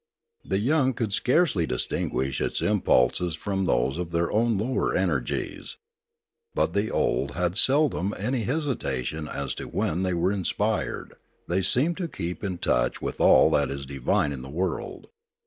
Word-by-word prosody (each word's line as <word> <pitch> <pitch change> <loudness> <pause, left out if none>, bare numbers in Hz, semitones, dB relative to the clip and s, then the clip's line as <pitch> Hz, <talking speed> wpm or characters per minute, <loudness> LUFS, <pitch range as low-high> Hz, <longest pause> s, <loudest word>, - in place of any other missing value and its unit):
The - - -1
young 130 +4 +2
could 110 -5 -2
scarcely 125 - +2
distinguish 65 0 -2
its - - -1
impulses 80 +7 +2
from 95 +3 -2
those 65 +2 +1
of 90 -2 -3
their 85 0 0
own 115 0 +2
lower 130 - 0
energies. - - -2 0.8
But - - +1
the 100 +2 0
old 70 +4 0
had 90 +1 0
seldom 130 - +2
any 120 +5 -1
hesitation 100 - -2
as 70 -3 -3
to - - -5
when 85 +4 -1
they 90 -2 0
were 85 +3 +1
inspired; 100 -3 -2 0.3
they 90 +3 +1
seemed 150 - +3
to 180 - -2
keep 90 - -5
in 95 -3 -2
touch - - +1
with - - -4
all - - +6
that - - +2
is 70 0 -5
divine 70 +1 0
in 70 -3 -5
the 65 - -9
world. 85 +3 -4
95 Hz, 160 wpm, -26 LUFS, 75-120 Hz, 0.8 s, all